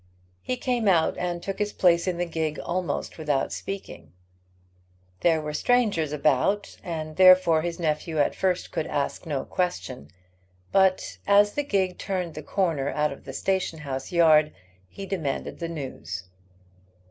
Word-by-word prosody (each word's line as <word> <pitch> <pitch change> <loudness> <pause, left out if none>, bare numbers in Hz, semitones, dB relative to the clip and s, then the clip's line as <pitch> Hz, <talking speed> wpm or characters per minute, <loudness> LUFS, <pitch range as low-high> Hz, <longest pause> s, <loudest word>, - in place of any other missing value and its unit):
He 255 - -3
came 245 -3 -1
out 170 -4 +3
and 175 -1 -3
took 195 0 -4
his 210 0 0
place 170 -1 +3
in 180 -2 0
the 175 - 0
gig 160 -2 -2
almost 175 -3 -3
without 145 -3 0
speaking. 85 - -7 1.1
There 165 +4 +3
were 150 -1 -5
strangers 205 - +1
about, 150 +7 +1
and 155 -2 -5
therefore 185 -3 +7
his 170 +1 -4
nephew 160 0 -1
at 145 - +2
first 185 -1 -1
could 155 - -2
ask 145 +3 -3
no 140 -4 -2
question, 180 -8 -3 0.6
but 190 -1 +2
as 205 +1 +5
the 290 - 0
gig 190 -8 0
turned 180 -4 -3
the - - -6
corner 160 -8 0
out 150 0 0
of - - -15
the 135 - -6
station 190 +1 -1
house 135 -3 -5
yard 155 -3 +5 0.4
he 195 - -8
demanded 165 -8 -3
the 170 -1 -3
news. 130 - -6
170 Hz, 155 wpm, -26 LUFS, 150-190 Hz, 1.1 s, therefore